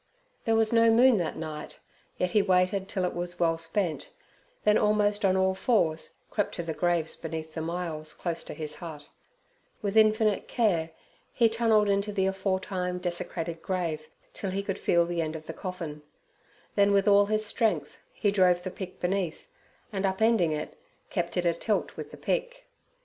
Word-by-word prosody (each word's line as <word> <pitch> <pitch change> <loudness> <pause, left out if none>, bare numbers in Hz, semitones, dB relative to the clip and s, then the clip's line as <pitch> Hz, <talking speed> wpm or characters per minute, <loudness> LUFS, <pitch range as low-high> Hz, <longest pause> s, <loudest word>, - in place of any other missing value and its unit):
There 225 -2 +3
was 225 0 +3
no 230 0 +6
moon 240 +1 +6
that 170 -4 -2
night, 155 -1 -6 0.4
yet 180 0 0
he 210 - +4
waited 190 0 +2
till 185 -2 -1
it 180 - -2
was 175 0 -4
well 165 -1 +2
spent, 165 0 -1 0.5
then 210 - +4
almost 210 0 +2
on 190 -1 +3
all 190 0 +3
fours 180 -6 +1 0.2
crept 205 - -1
to 170 - -3
the 165 -1 -3
graves 175 -1 0
beneath 160 -1 -6
the 160 - -4
myalls 160 -2 -3
close 170 -2 -3
to - - -7
his 150 -1 -6
hut; 155 -4 -9 0.7
with 200 0 -1
infinite 215 -1 +4
care 180 -9 +1 0.4
he 235 - +4
tunnelled 225 -2 +3
into 200 +1 +1
the 195 -2 +1
aforetime 190 -1 -1
desecrated 175 -2 -3
grave 165 -5 -2 0.3
till 195 - -4
he 195 +1 -2
could 195 -1 -3
feel 170 -1 +3
the 170 -1 -1
end 160 0 -3
of 155 -1 -7
the - - -6
coffin, 170 -6 -6 0.7
then 200 0 +4
with 200 +1 +3
all 200 0 +6
his 215 0 0
strength 220 +1 0
he 205 - 0
drove 180 -3 +3
the 185 - -4
pick 185 0 -8
beneath, 180 -2 -1 0.5
and 195 -1 -2
upending 195 -2 +3
it, 150 0 -4 0.3
kept 175 +1 -2
it 180 - +1
atilt 170 +5 0
with - - -7
the - - -11
pick. - - -2
185 Hz, 175 wpm, -28 LUFS, 170-210 Hz, 0.7 s, no